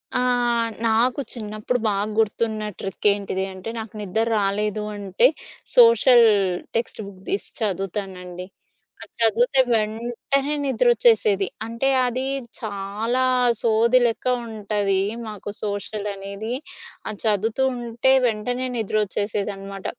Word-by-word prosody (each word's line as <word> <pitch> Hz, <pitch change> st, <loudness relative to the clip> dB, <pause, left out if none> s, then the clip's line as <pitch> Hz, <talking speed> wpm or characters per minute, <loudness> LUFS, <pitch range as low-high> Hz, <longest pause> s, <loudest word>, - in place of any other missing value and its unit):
ఆ! -, -, +3 dB, 0.7 s
నాకు 235 Hz, +5 st, +2 dB
చిన్నప్పుడు 215 Hz, +2 st, -3 dB
బాగా 205 Hz, 0 st, 0 dB
గుర్తున్న 220 Hz, 0 st, 0 dB
ట్రికేంటిది 195 Hz, -1 st, 0 dB
అంటే, 190 Hz, +4 st, -7 dB
నాకు 220 Hz, -1 st, -7 dB
నిద్ర 210 Hz, +3 st, 0 dB, 0.2 s
రాలేదు 210 Hz, +1 st, -1 dB
అంటే 200 Hz, +4 st, +3 dB, 0.5 s
సోషల్ 270 Hz, -, +7 dB, 0.5 s
టెక్స్ట్ 230 Hz, -1 st, -2 dB
బుక్ 190 Hz, -1 st, -13 dB
దీసి 200 Hz, -, -2 dB
చదువుతానండి. 190 Hz, -3 st, -4 dB, 0.6 s
అది -, -, -14 dB
చదువితే 235 Hz, +4 st, +4 dB
వెంటనే 235 Hz, +6 st, -1 dB
నిద్రొచ్చేసేది. 230 Hz, -5 st, +3 dB, 0.2 s
అంటే, 230 Hz, +4 st, -1 dB, 0.2 s
అది 255 Hz, +2 st, -2 dB, 0.3 s
చాలా 215 Hz, +4 st, -2 dB, 0.4 s
సోది 230 Hz, +2 st, +4 dB
లెక్క 230 Hz, -1 st, -1 dB, 0.2 s
ఉంటది 205 Hz, -3 st, -1 dB, 0.3 s
మాకు 210 Hz, -1 st, -7 dB
సోషల్ 205 Hz, 0 st, -3 dB
అనేది. 200 Hz, +4 st, -6 dB, 0.5 s
అది 210 Hz, -, -5 dB
చదువుతూ 220 Hz, +4 st, +1 dB
ఉంటే 240 Hz, +2 st, +1 dB, 0.2 s
వెంటనే 245 Hz, +3 st, -2 dB
నిద్రొచ్చేసేదనమాట. 200 Hz, -2 st, -2 dB
215 Hz, 100 wpm, -23 LUFS, 200-235 Hz, 0.7 s, సోషల్